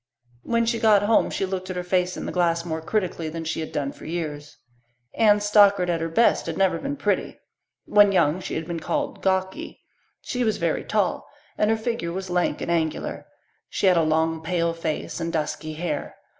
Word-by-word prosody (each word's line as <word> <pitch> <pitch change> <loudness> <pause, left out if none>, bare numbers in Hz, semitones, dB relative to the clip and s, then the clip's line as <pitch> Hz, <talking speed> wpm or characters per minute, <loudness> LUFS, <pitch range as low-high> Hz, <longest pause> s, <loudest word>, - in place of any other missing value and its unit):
When 230 - +1
she 230 0 0
got 210 -2 +5
home 220 +2 +3
she 195 - -1
looked 185 -1 -4
at 185 - -4
her 180 - -3
face 180 0 0
in - - -5
the - - -3
glass 170 -1 +1
more 160 -1 -3
critically 175 -3 -2
than 165 +1 -5
she 160 0 -3
had 160 - -5
done 140 -2 -2
for - - -13
years. 150 -3 -5 0.6
Anne 210 -2 +5
Stockard 200 -3 +4
at 165 -1 -1
her 165 - -2
best 200 +4 +3
had 165 - -3
never 190 -1 +2
been 280 +1 -3
pretty. - - -1 0.5
When 205 -1 +5
young 170 -3 +2
she - - -5
had 160 - -3
been 170 0 -4
called 290 - -3
"gawky." 190 0 -1 0.4
She 250 0 -2
was 220 -3 +1
very 170 -2 -1
tall 205 -4 -1 0.3
and 210 - +1
her 225 - +2
figure 220 -7 -3
was 185 +1 -5
lank 180 0 0
and - - -2
angular. 160 -2 -2 0.4
She - - -1
had 185 -2 +6
a - - +5
long, 160 +1 +1
pale 170 0 0
face 165 -1 -4
and 165 0 -2
dusky 155 -1 -3
hair. 165 +2 -4
180 Hz, 205 wpm, -24 LUFS, 165-205 Hz, 0.6 s, had